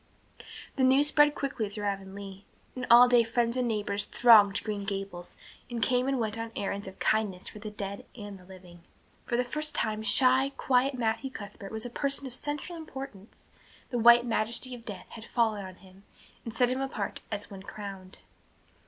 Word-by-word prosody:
The 265 - +2
news 270 +3 +6
spread 295 -1 +4
quickly 250 -6 -3
through 205 +1 -7
Avonlea, 195 0 -5 0.3
and 255 0 -5
all 240 +1 +9
day 245 -1 +5
friends 235 +1 0
and 250 -1 0
neighbors 205 -2 -1
thronged 215 -4 +5
Green 210 -2 -3
Gables 195 -3 -6 0.3
and 240 -1 -4
came 250 +4 +1
and 270 -1 0
went 220 -1 -2
on 225 0 -5
errands 200 0 -3
of 190 - -10
kindness 205 -4 0
for 210 - -8
the 215 0 -6
dead 200 -1 -6
and 205 -5 -10
living. 180 -2 -14 0.5
For 235 - 0
the 250 - +2
first 305 +5 -3
time 215 0 -1
shy, 260 +5 +4
quiet 265 +1 +2
Matthew 235 +2 -1
Cuthbert 205 -4 -9
was 220 +1 -5
a 245 - -6
person 280 +2 -1
of 260 - -7
central 295 +6 -5
importance; 265 -9 -10 0.4
the 245 - -1
white 235 +1 +7
majesty 235 +2 -1
of 235 -2 -10
death 190 -4 -7
had 225 -1 -10
fallen 220 -5 0
on 185 -1 -9
him 190 0 -18 0.4
and 230 - -6
set 245 +2 +2
him 260 +1 -1
apart 240 -7 -4
as 205 0 -5
one 195 -1 -8
crowned. 195 -2 -9
225 Hz, 185 wpm, -29 LUFS, 200-250 Hz, 0.5 s, all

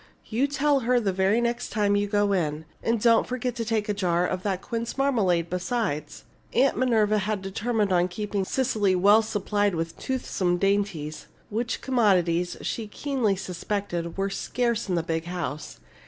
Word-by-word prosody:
You 245 +5 0
tell 285 0 +2
her 250 0 +2
the 200 -5 0
very 190 +4 +2
next 240 +1 -1
time 205 -2 +1
you 205 0 +1
go 205 0 +2
in. 155 -4 -1 0.2
And 230 0 +1
don't 230 +1 +4
forget 250 0 -2
to 230 - -1
take 220 -2 -1
a 210 - 0
jar 180 -3 +1
of 185 0 -2
that 190 -2 -2
quince 230 +1 -4
marmalade, 200 -12 +2
besides." 180 -3 -2 0.3
Aunt 265 +3 +3
Minerva 215 -4 +2
had 205 0 -2
determined 205 +1 0
on 175 0 +3
keeping 200 +1 -3
Cecily 215 -4 +1
well 205 +4 +6
supplied 205 -2 0
with 165 0 -3
toothsome 190 -9 -1
dainties, 195 -6 -1 0.2
which 225 +2 -2
commodities, 180 -8 +2
she 225 -2 -3
keenly 245 -3 0
suspected, 180 -2 -4
were 195 0 -1
scarce 235 -1 -1
in 180 - +1
the 170 - 0
big 165 0 -2
house. 170 - -5
205 Hz, 170 wpm, -26 LUFS, 180-235 Hz, 0.3 s, well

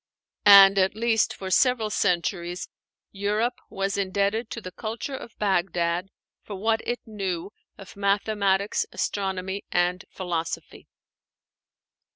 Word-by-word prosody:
And, 195 -1 +9
at 190 +1 +2
least 225 -1 +2
for 190 -1 -6
several 235 -1 +3
centuries, 175 -2 -1 0.4
Europe 210 +5 -1
was 195 +1 -2
indebted 200 +4 0
to - - -5
the 185 -4 -8
culture 225 +7 -5
of 235 - -10
Bagdad 180 -2 0 0.3
for 205 - -8
what 220 +3 0
it 245 - -2
knew 195 -4 -4 0.3
of 195 - -12
mathematics, 200 0 +1
astronomy, 190 0 -3
and 180 +1 +1
philosophy. 170 -3 -5
195 Hz, 115 wpm, -25 LUFS, 185-215 Hz, 0.4 s, And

